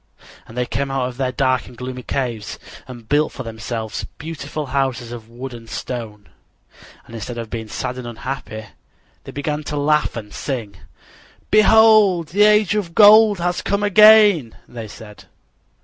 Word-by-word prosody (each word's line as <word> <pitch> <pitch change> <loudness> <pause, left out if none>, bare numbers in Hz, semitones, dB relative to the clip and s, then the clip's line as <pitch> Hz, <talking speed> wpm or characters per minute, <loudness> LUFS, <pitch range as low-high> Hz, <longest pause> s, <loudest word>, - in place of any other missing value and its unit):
And 115 - -13
they 125 - 0
came 140 +3 -3
out 135 -2 -1
of 125 - -12
their 130 -1 -1
dark 130 -1 0
and 125 - -14
gloomy 125 +1 -6
caves 120 -5 -4 0.3
and 120 -3 -11
built 150 +4 +1
for 130 - -7
themselves 110 -1 -5
beautiful 150 -1 -6
houses 130 -4 -1
of 115 -2 -9
wood 125 +2 -8
and 115 -1 -11
stone. 110 -5 -7 0.8
And - - -15
instead 115 +2 -6
of 115 -2 -7
being 115 -2 -5
sad 125 +4 -5
and 125 - -7
unhappy 115 -2 -6 0.6
they - - -8
began 150 +1 -3
to 150 - -4
laugh 150 +1 +1
and 105 -3 -8
sing. 120 -8 -5 0.7
"Behold, 215 -6 +5
the 200 +5 0
Age 210 -1 +4
of 195 -6 -3
Gold 215 0 +7
has 175 +1 -2
come 200 +1 -1
again," 205 - +6
they 115 -2 -8
said. 105 0 -13
130 Hz, 165 wpm, -20 LUFS, 115-170 Hz, 0.8 s, Gold